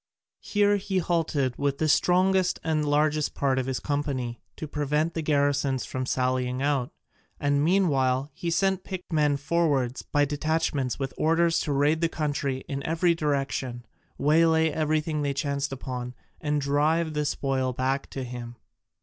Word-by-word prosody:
Here 205 0 +2
he 195 -1 -2
halted 160 -7 0
with 140 -1 0
the 155 - 0
strongest 185 +3 +3
and 155 -1 0
largest 150 0 +1
part 135 -2 +1
of 130 - -2
his 130 -2 -1
company, 135 -5 -2
to 155 - -6
prevent 150 +2 0
the 165 - -2
garrisons 145 -3 +1
from 130 0 -4
sallying 125 0 0
out, 140 -3 0 0.5
and 145 0 +1
meanwhile 145 -6 +2
he 170 - -4
sent 190 +2 +1
picked 185 -3 -7
men 150 -2 +3
forward 140 -4 0
by 145 0 +3
detachments 145 -3 -1
with 135 -1 -4
orders 165 +1 +3
to 150 - -2
raid 145 +3 +2
the 165 - +2
country 145 -4 -2
in 140 -3 -3
every 165 +3 +2
direction, 135 -5 -2 0.3
waylay 160 +2 +4
everything 155 0 0
they 140 -1 -1
chanced 140 0 -1
upon, 125 -2 -5 0.3
and 150 -1 0
drive 155 +3 +1
the 150 0 0
spoil 135 -3 -1
back 130 +2 -1
to 135 - -5
him. 120 -1 -7
145 Hz, 155 wpm, -26 LUFS, 135-160 Hz, 0.5 s, waylay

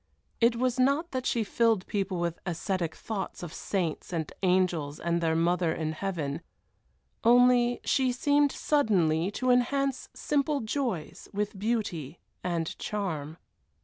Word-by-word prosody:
It 235 0 +4
was 250 +1 0
not 280 +6 +2
that 255 -1 -2
she 230 - +1
filled 225 -2 +2
people 195 -3 -2
with 170 -1 -2
ascetic 175 -1 -2
thoughts 195 -5 -5
of 170 - -6
saints 180 -5 -2
and 160 -3 -3
angels 180 -6 +1
and 170 0 0
their 160 -1 +1
mother 170 0 +2
in 155 -1 -2
heaven, 160 -4 -3 0.8
only 245 0 +5
she 260 -2 +2
seemed 285 +3 +3
suddenly 185 - +2
to 255 +5 0
enhance 265 +2 +1
simple 290 0 0
joys 220 - -3
with 205 -1 -2
beauty 190 - -2 0.3
and 170 -3 -2
charm. 160 -7 -3
195 Hz, 135 wpm, -28 LUFS, 170-245 Hz, 0.8 s, only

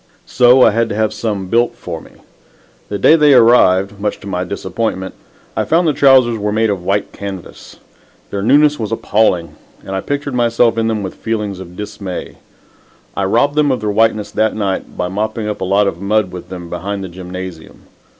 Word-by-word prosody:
So 125 +1 +5
I 115 - +6
had 115 +1 0
to 100 - -3
have 110 0 0
some 105 -3 -3
built 120 +5 +1
for - - -7
me. - - -15 0.8
The 105 - -2
day 125 +11 +5
they 150 -3 +5
arrived, 100 -5 +4
much 105 0 -2
to - - -12
my 90 -2 -2
disappointment, 95 +1 -3 0.4
I - - 0
found 165 +2 +2
the 150 - +2
trousers 130 -5 +4
were 105 0 -1
made 110 0 +1
of 95 -3 -4
white 100 +2 -1
canvas. 100 -3 -8 0.6
Their 100 - -3
newness 145 +6 +4
was 110 -1 -3
appalling 90 -8 0 0.3
and - - -7
I 95 - -2
pictured 145 +2 -3
myself 120 -1 +2
in 115 0 0
them 110 -2 -1
with 95 - -5
feelings 105 -4 -3
of 90 -1 -10
dismay. 100 -3 -6 0.8
I 100 - -1
robbed 120 +9 +2
them 150 -1 +2
of 130 - 0
their 105 -1 -2
whiteness 105 -1 +1
that 110 0 0
night 100 -3 -3
by 90 - -1
mopping 110 +3 -3
up 105 -2 -4
a - - -1
lot 100 +2 +2
of 90 -2 -3
mud 100 -1 +1
with 90 -1 -9
them 90 -2 -7
behind 100 +3 -4
the - - -5
gymnasium. 90 -1 -9
105 Hz, 200 wpm, -16 LUFS, 95-115 Hz, 0.8 s, I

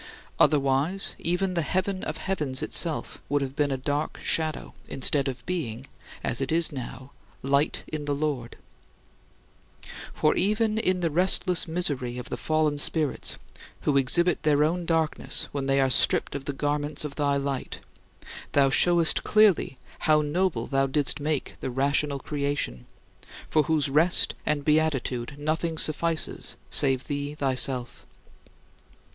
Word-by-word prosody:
Otherwise, 145 +6 +2
even 180 +2 0
the 170 - 0
heaven 185 +4 -2
of - - -4
heavens 150 -9 -2
itself - - +1
would 145 0 +1
have 135 0 -6
been 145 -1 +1
a 135 - -1
dark 145 +3 -3
shadow, 155 -1 -1 0.2
instead 135 +1 +2
of 130 -1 -6
being, 135 -9 -4 0.4
as 120 - +1
it 135 - -2
is 165 0 +1
now, 130 0 -8 0.3
light 140 +2 +1
in 150 -1 -5
the 145 -1 -1
Lord. 140 -5 -3 1.5
For 155 - +2
even 215 +2 +1
in 185 -4 0
the 165 -2 0
restless 180 +1 +2
misery 145 -8 -1
of 125 0 -7
the - - -1
fallen 155 -2 0
spirits, 150 -1 -1 0.4
who 145 - 0
exhibit 170 +6 +3
their 150 -1 +3
own 170 +2 -1
darkness 160 -2 +1
when 140 -1 -3
they 135 0 +2
are 135 -1 +2
stripped - - +3
of 140 -1 -6
the 145 - -2
garments 145 +1 -2
of 145 - -5
thy 140 -1 0
light, 140 -1 -4 0.7
thou 140 -1 +4
showest 170 +2 +4
clearly 210 -10 +3 0.2
how 155 -1 +3
noble 150 -5 0
thou 135 -1 +1
didst 140 +1 +1
make 150 -1 -3
the - - -4
rational 140 +2 0
creation, 140 - -3 0.6
for 155 - +4
whose 155 -2 +1
rest 155 +6 +3
and 145 -2 0
beatitude 145 -4 0
nothing 160 +2 -2
suffices 160 +1 -1 0.2
save 135 -2 +2
thee 145 0 -4
thyself. 130 -3 0
145 Hz, 145 wpm, -26 LUFS, 135-160 Hz, 1.5 s, thou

